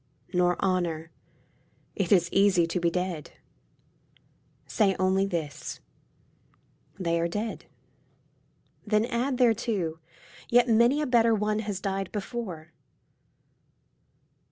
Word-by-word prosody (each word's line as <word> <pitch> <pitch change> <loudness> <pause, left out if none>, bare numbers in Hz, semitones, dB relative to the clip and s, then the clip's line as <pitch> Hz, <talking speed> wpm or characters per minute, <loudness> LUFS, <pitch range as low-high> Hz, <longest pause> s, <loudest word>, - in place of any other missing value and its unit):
Nor 180 -1 +2
honour. 170 -4 -1 0.8
It 195 -4 -2
is 175 -4 +5
easy 195 -3 +4
to 165 +2 -2
be 170 0 +2
dead. 180 -3 -4 1.3
Say 195 -4 +1
only 190 +1 +2
this, 160 -6 -5 0.6
" - - -36
They 170 -2 0
are 170 - +1
dead." 210 +6 -4 1.2
Then 215 0 +1
add 250 +2 -1
thereto, 215 -9 +1 0.2
" - - -21
Yet 245 +1 +5
many 235 +6 +4
a - - 0
better 230 -3 +4
one 210 0 0
has 205 -3 -3
died 195 -2 -3
before." 195 -7 -6
195 Hz, 110 wpm, -27 LUFS, 175-225 Hz, 1.3 s, is